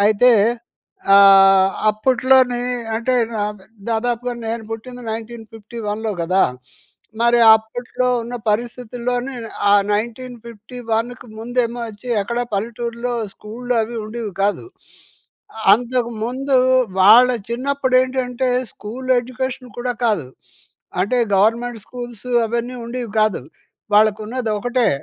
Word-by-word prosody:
అయితే, 225 +4 +5 0.8
ఆహ్, 195 -1 +7 0.2
అప్పట్లోనే 255 +2 +2 0.4
అంటే, 250 +2 0 0.2
నాక్ 210 -1 -3 0.3
దాదాపుగా 240 +2 -2
నేను 225 0 -3
పుట్టింది 245 +2 -8
1951‌లో 225 -1 -6
గదా! 185 +3 +3 0.8
మరి 235 0 +4 0.2
అప్పుట్లో 245 +3 -3 0.2
ఉన్న 240 +2 -7
పరిస్థితుల్లోనేను, 245 +2 -3 0.2
ఆ - - +6 0.2
1951కు 235 +1 -4
ముందేమో 240 +1 -2
వచ్చి, 215 +4 -11
ఎక్కడా 235 +4 -2
పల్లెటూర్లో 235 +3 -3 0.2
స్కూల్లు 245 +3 -5
అవి 235 +2 -6
ఉండీవి 215 -2 -6
కాదు. 205 - 0 0.9
అ - - -7
అంతక 245 +1 +1 0.2
ముందూ 265 +2 0 0.4
వాళ్ళ 225 +6 +8 0.2
చిన్నప్పుడేంటంటే, 255 0 0 0.2
స్కూల్ 250 +5 -8
ఎడ్యుకేషన్ 255 0 -5
కూడా 245 0 -1
కాదు. 205 - +1 0.8
అంటే, 245 +5 0 0.2
గవర్నమెంట్ 225 +3 +1
స్కూల్సు 245 -1 -8 0.2
అవన్నీ 235 +2 -3
ఉండీవి 240 -2 -5
కాదు. 215 -11 +1 0.5
వాళ్ళకున్నదొకటే. 220 +3 +1
235 Hz, 95 wpm, -19 LUFS, 215-250 Hz, 0.9 s, వాళ్ళ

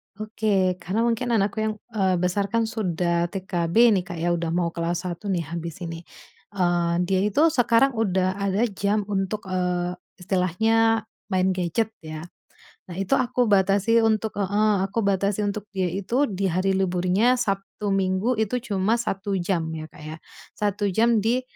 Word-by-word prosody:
Oke, 205 -4 0
karena 195 +7 -1
mungkin 235 +1 0
anakku 200 +1 0
yang, 215 0 -1 0.2
eee, 190 -4 +1
besarkan 200 +5 0
sudah 175 -6 -1
TK 180 -2 -3
B 230 +7 +5
nih, 190 -3 +2
Kak, 175 - -6
ya, 175 +1 0
udah 170 -1 -1
mau 170 -1 0
kelas 170 +2 -2
1 180 +3 -5
nih, 180 -4 0
habis 170 +1 -5
ini. 165 0 -6 0.5
Eee, 175 -2 +1
dia 190 +1 +1
itu 290 +11 +3
sekarang 245 0 +3
udah 190 -3 0
ada 200 +3 +1
jam 205 +2 0
untuk, 195 +2 -2
eee, 180 -1 -1 0.2
istilahnya 220 +5 +1 0.2
main 190 -1 +1
gadget 185 +5 -1
ya. 155 0 -8 0.7
Nah, 175 - -8
itu 195 +7 +1
aku 250 -1 +1
batasi 200 +3 +3
untuk 220 -1 0
heeh, 205 +2 +2
aku 205 +4 -2
batasi 200 +1 +1
untuk 205 0 -3
dia 185 -2 0
itu 200 +10 0
di 195 -1 -3
hari 185 +3 +1
liburnya 190 +6 +2
Sabtu, 195 -4 -1 0.2
Minggu 195 +5 +1
itu 220 +3 0
cuma 215 -1 0
1 195 -2 -3
jam 175 -2 -1
ya, 155 -1 -6
Kak, 150 - -15
ya, 155 +1 -7 0.4
1 205 0 -1
jam 225 +2 +3
di, 245 +3 +2
195 Hz, 165 wpm, -24 LUFS, 180-215 Hz, 0.7 s, B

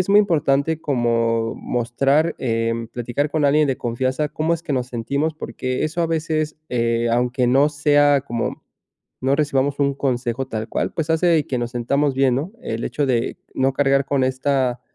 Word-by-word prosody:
es 180 - -1
muy 205 +1 +7
importante 160 -4 +1
como 115 -4 0
mostrar, 135 +6 0
eh, 115 -1 -1
platicar 120 +4 -2
con 155 0 0
alguien 150 +2 +4
de 135 -2 0
confianza 130 +5 -1
cómo 160 +3 0
es 165 - -7
que 160 - -3
nos 125 -2 -1
sentimos, 140 +6 -2
porque 130 -3 -4
eso 155 +3 -2
a 165 - +2
veces, 155 -1 -1
eh, 115 -1 0
aunque 125 +1 +1
no 135 +4 +4
sea 145 -1 +3
como 120 -4 -4 0.6
no 135 +2 +2
recibamos 140 -1 0
un 140 -1 +2
consejo 130 -1 -2
tal 110 -2 -4
cual, - - -1
pues, 160 -1 -2
hace 160 -2 +3
que 125 - -2
nos 120 -1 -2
sentamos 135 +4 0
bien, 135 -1 +3
¿no? 145 +9 -2
El 115 +1 -3
hecho 145 - -1
de 120 -3 0 0.2
no 130 0 +1
cargar 135 0 +2
con 140 -1 +1
esta 130 -1 0
135 Hz, 180 wpm, -21 LUFS, 120-150 Hz, 0.6 s, muy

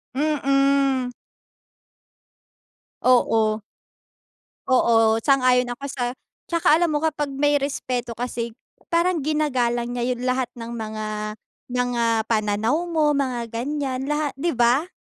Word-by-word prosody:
Mm. 275 -2 +2 1.9
Oo. 225 -4 +3 1.0
Oo, 250 -2 +3 0.3
sang-ayon 255 -2 +3
ako 275 +3 -7
sa 255 -2 -3 0.5
tsaka 335 -3 +4
alam 340 +1 +2
mo 300 - +1
kapag 295 -2 -1
may 290 +2 +1
respeto 255 -4 -3
kasi 235 -1 -3 0.4
parang 340 -1 +2
ginagalang 250 -5 0
niya 245 +1 0
yun 245 - -8
lahat 255 -1 0
ng 230 0 -6
mga 215 -1 -5 0.6
mga 245 -1 0 0.3
pananaw 220 +9 +1
mo, 315 -3 +2
mga 255 -4 -1
ganyan, 265 +2 -3
laha 295 0 0
di 335 +2 0
ba? 245 +6 +3
260 Hz, 110 wpm, -23 LUFS, 240-295 Hz, 1.9 s, tsaka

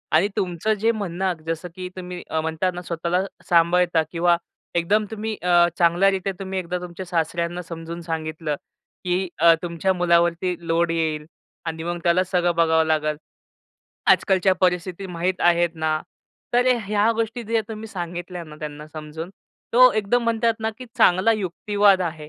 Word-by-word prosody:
आणि 170 +6 +4
तुमचं 185 +2 0
जे 225 +1 +4
म्हणणं 190 -3 -2
जसं 165 +2 -3
की 185 -1 -5
अ, - - -9
तुम्ही 180 -1 -7 0.2
म्हणता 160 +3 -1
ना 180 - -5
स्वतःला 170 +1 -1 0.3
सांभाळता 170 0 +4
किंवा 170 0 +3 0.4
एकदम 200 +6 +2
तुम्ही 220 0 -3
अ, 175 -1 +5
चांगल्यारिते 190 +3 +3
तुम्ही 190 -1 -3
एकदा 180 0 -3
तुमच्या 180 +1 -7
सासऱ्यांना 170 0 -1
समजून 165 0 -7
सांगितलं 160 -2 -3 0.5
की 185 +1 0
अ, 165 +1 +7
तुमच्या 175 +2 0
मुलावरती 175 0 +2
लोड 165 +1 +2
येईल 160 -2 -1 0.4
आणि 160 -1 -4
मग 175 +1 -3
त्याला 180 +1 +3
सगळं 175 -2 +1
बघावं 160 -1 +3
लागेल. 155 -1 0 0.9
आजकालच्या 190 -1 +4
परिस्थिती 180 +1 0
माहीत 180 +1 -2
आहेत 175 0 +4
ना, 155 -1 0 0.5
तर 245 +1 +3 0.2
ह्या 210 +2 +2
गोष्टी 230 +1 -2
जे 225 +1 +1
तुम्ही 220 0 -6
सांगितल्या 175 -1 -5
ना, 155 -1 -12
त्यांना 150 0 -7
समजून 155 +2 -7 0.4
तो 255 +1 +8
एकदम 215 +3 +1
म्हणतात 230 0 +2
ना 220 - 0
की 255 - -7
चांगला 185 +2 +5
युक्तिवाद 205 0 +2
आहे 155 -3 -5
175 Hz, 155 wpm, -23 LUFS, 165-190 Hz, 0.9 s, तो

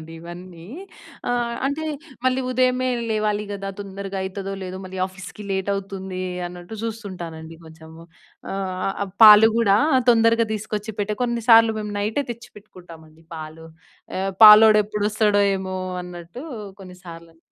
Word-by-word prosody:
ఉంటానండి 160 +1 -11
ఇవన్నీ. 175 0 -11 0.6
ఆహ్, 240 -1 -1
అంటే, 290 +3 -3 0.4
మళ్ళీ 255 0 +2
ఉదయమే 255 0 +1 0.2
లేవాలి 210 -1 -1
గదా! 195 -1 -5
తొందరగయితదో 195 0 -5
లేదో, 185 0 -6
మళ్ళీ 185 0 -8
ఆఫీస్‌కి 195 +2 -11
లేటవుతుందీ 190 -1 -4 0.3
అన్నట్టు, 180 +4 -10
జూస్తుంటానండి 175 -8 -7
కొంచము. 160 +1 -14 0.5
ఆహ్, 190 -1 -4 0.3
ఆహ్, 195 - -11
పాలు 215 +1 +9
గూడా 205 -4 +3 0.3
తొందరగా 230 0 +3
దీసుకొచ్చి 215 0 -4
పెట్టె, 210 +1 -2
కొన్నిసార్లు 230 -2 +4
మేము, 210 -1 -5
నైటే 220 +8 -1
తెచ్చిపెట్టుకుంటామండి 170 -8 -16
పాలు. 155 +1 -9 0.5
ఎ - - -1 0.2
పాలోడెప్పుడొస్తాడో 210 -1 +6 0.2
ఏమో 190 0 -5 0.3
అన్నట్టూ 175 +6 -10 0.4
కొన్నిసార్లని. 170 -3 -13
195 Hz, 115 wpm, -22 LUFS, 180-220 Hz, 0.6 s, పాలు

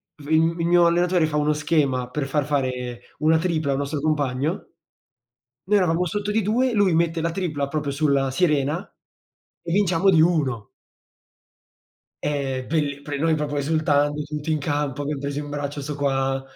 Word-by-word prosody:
f 145 - -14
mhmm, 165 +2 +2
il 165 - 0
mio 175 0 +5
allenatore 175 0 +3
fa 155 -1 -2
uno 150 0 +2
schema 145 -5 0
per 135 +1 -3
far 145 0 0
fare 125 -4 -2 0.2
una 155 +2 +4
tripla 160 -4 0
a - - +2
un 135 - -1
nostro 140 +1 -2
compagno. 145 +2 -1 1.0
Noi 205 +3 +3
eravamo 180 -2 +2
sotto 205 +3 -2
di 220 +1 +2
2, 240 +5 +1
lui 200 -4 +3
mette 165 0 +1
la 170 +1 -1
tripla 155 -6 -2
proprio 145 0 -2
sulla 140 -2 +1
sirena 150 +2 +1 0.8
e 170 - -4
vinciamo 185 -1 +3
di 165 -4 +5
1. 145 - +1 1.6
Ehm, 135 -3 -2
belli 145 -3 -1
pre 145 0 -5
noi 160 +1 +2
proprio 150 -1 -3
esultando, 145 0 +1
tutti 150 +1 -5
in 155 - +2
campo, 145 -1 -2
abbiam 145 0 -3
preso 140 +1 -3
in 145 -1 -6
braccio 145 0 -4
'sto 150 +1 -5
qua, 135 -1 0
150 Hz, 175 wpm, -23 LUFS, 140-165 Hz, 1.6 s, mio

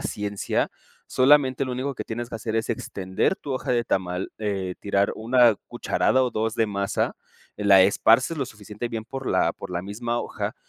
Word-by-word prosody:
ciencia. 105 -1 -2 0.4
Solamente, 135 0 +4
lo 130 - -4
único 130 +2 -3
que - - -4
tienes 120 +1 -5
que 115 - -5
hacer, 110 0 -4
es 115 0 0
extender 95 - -1
tu 140 - -6
hoja 130 - -2
de 120 -1 +2
tamal, 90 -3 -2
eh, 95 -4 -2
tirar 100 0 +1
1 120 -1 +4
cucharada 130 0 +1
o 125 - 0
2 110 +1 -1
de 115 - +2
masa. 100 -1 -1 0.4
La 100 -2 +6
esparces 115 - +4
lo 135 - -1
suficiente 105 +1 -7
bien 110 -1 -5
por 135 +1 -7
la - - +2
por 95 - -9
la 85 -1 -2
misma 115 +4 -3
hoja, - - -4
110 Hz, 185 wpm, -25 LUFS, 100-125 Hz, 0.4 s, La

